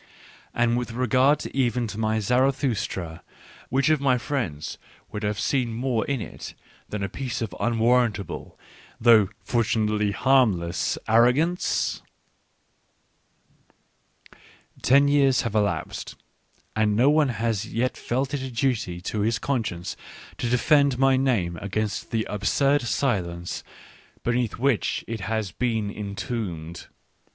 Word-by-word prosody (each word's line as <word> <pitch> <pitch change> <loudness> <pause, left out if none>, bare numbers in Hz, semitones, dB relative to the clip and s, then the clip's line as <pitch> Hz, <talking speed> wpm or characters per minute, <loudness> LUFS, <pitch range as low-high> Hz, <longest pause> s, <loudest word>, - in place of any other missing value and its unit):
And 120 0 +2
with 120 -1 -5
regard 130 +4 +2
even 125 -3 +1
to 105 -1 -6
my 110 0 +1
Zaratkustra, 120 - 0 0.5
which 135 +4 +2
of 155 -3 +3
my 130 -3 +3
friends 115 - -3 0.3
would 105 - -5
have 105 0 -1
seen 120 -1 0
more 120 -1 0
in 140 -2 0
it - - -8 0.3
than 105 -1 -3
a - - 0
piece 125 +4 -4
of 110 -6 -4
unwarrantable, 115 -5 0 0.4
though 110 -4 +6
fortunately 110 -3 +1
harmless, 100 -7 +2
ar 115 +1 +6
rogance? 160 +9 +1 2.8
Ten 140 +2 +5
years 140 -3 +4
have 115 - -3
elapsed, 105 -2 -1 0.6
and 110 -1 +2
no 130 +6 +5
one 150 -2 +3
has 115 -2 -2
yet 125 +3 0
felt 130 +3 -2
it 145 - -1
a 130 - -4
duty 115 -8 -1
to 105 - -3
his 115 +3 +1
conscience 105 -10 -2 0.4
to 120 - -1
defend 140 +2 +3
my 135 0 +4
name 115 -11 +1
against 100 +1 -3
the 110 -1 -1
absurd 140 +8 +1
silence 95 -9 -2 0.6
beneath 120 -1 0
which 130 -2 0
it 115 -1 -4
has 110 -1 -2
been 110 -1 -1
entombed. 100 -5 -5
115 Hz, 125 wpm, -25 LUFS, 105-130 Hz, 2.8 s, though